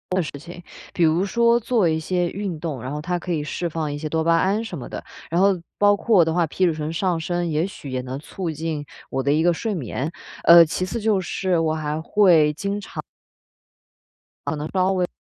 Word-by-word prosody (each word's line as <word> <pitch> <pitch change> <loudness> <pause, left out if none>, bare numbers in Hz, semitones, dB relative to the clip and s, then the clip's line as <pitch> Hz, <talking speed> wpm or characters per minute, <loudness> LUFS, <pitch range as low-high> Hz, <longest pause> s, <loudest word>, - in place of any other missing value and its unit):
的 185 - +2
事 - - -6
情。 175 +3 -11 0.3
比 175 - +1
如 165 +4 +3
说 235 +3 +3
做 225 -5 +1
一 160 0 +1
些 175 +1 -1
运 195 -4 -4
动， 150 -7 -4
然 130 - -5
后 150 0 -4
它 175 +2 -2
可 180 - -5
以 155 -3 -1
释 170 +3 -3
放 155 -2 -3
一 - - -4
些 155 +1 -4
多 160 +1 0
巴 165 0 +3
胺 200 +6 +1
什 180 -7 -6
么 125 - -7
的。 - - -6 0.3
然 170 +3 +1
后 195 -2 +3 0.2
包 205 0 +5
括 220 -2 +2
我 170 - +7
的 160 - 0
话， 170 -2 +2
皮 185 +4 0
质 165 - +2
醇 155 0 -4
上 175 -1 0
升 175 +1 -2
也 160 +2 0
许 145 -7 -9
也 130 -1 -2
能 130 +1 -5
促 175 +3 -5
进 155 -1 -4 0.2
我 135 - -1
的 140 +2 +1
一 160 +2 +2
个 175 0 +4
睡 220 +5 -3
眠。 140 +1 -3 0.4
呃 170 0 +9
其 180 +3 -2
次 230 +5 -4
就 210 -3 +2
是 185 -1 -1
我 160 -1 +1
还 155 0 -2
会 165 -6 +4
经 200 +5 -3
常 - - -7 1.5
可 155 - 0
能 150 +1 -4
稍 190 0 +2
微 180 -1 0
170 Hz, 250 characters per minute, -22 LUFS, 155-185 Hz, 1.5 s, 呃